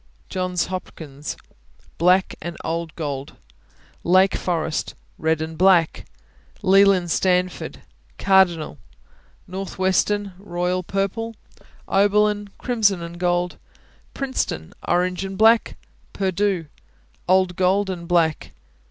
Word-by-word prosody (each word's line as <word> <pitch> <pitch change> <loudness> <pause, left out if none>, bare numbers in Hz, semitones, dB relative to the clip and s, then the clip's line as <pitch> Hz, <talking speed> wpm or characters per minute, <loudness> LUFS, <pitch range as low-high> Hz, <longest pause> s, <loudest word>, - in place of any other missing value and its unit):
Johns 185 -1 -1
Hopkins 155 -6 -7 0.6
Black 180 +3 +3
and 175 0 -6
old 165 0 -3
gold. 140 -3 -4 0.7
Lake 185 +2 +4
Forest 160 -3 -2 0.2
Red 160 0 +1
and 160 0 -6
black. 180 -1 +3 0.6
Leland 195 -2 +5
Stanford 180 0 0 0.4
Cardinal. 180 - +3 0.7
Northwestern 190 +2 -1
Royal 180 -1 -2
Purple. 200 +5 -2 0.5
Oberlin 205 +1 +2
Crimson 205 -7 +1
and 170 +1 -8
gold 175 0 0 0.6
Princeton 260 - -3
Orange 180 +1 +1
and 195 0 -5
black. 225 +2 +4 0.4
Purdue 190 -2 0 0.6
Old 185 -1 +3
gold 190 +2 +2
and 175 -3 -5
black. 165 -3 +1
185 Hz, 95 wpm, -22 LUFS, 170-195 Hz, 0.7 s, Leland